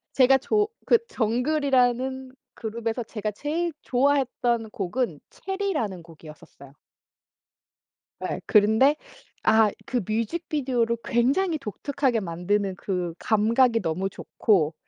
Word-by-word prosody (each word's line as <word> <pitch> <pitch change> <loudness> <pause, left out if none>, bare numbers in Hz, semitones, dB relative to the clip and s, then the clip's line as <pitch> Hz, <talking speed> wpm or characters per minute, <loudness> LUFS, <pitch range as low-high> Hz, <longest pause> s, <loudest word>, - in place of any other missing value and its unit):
제가 265 0 +6
조 420 +10 +1 0.2
그 470 - +6
정글이라는 260 +1 +1 0.2
그룹에서 230 +1 -3
제가 215 -1 -4
제일 320 - -2
좋아했던 245 -4 +1
곡은 200 - -2
체리라는 370 - -3
곡이었었어요. 155 -4 -14 1.5
예. - - -3
그런데 220 +7 +4 0.5
아 220 -1 +5 0.2
그 255 - -1
뮤직비디오를 240 0 -1
굉장히 295 +9 +1
독특하게 265 +1 -1
만드는 190 +2 -1
그 180 -3 -3
감각이 230 +2 +3
너무 180 +3 -1
좋고. 165 -6 +1
235 Hz, 255 characters per minute, -25 LUFS, 205-270 Hz, 1.5 s, 제가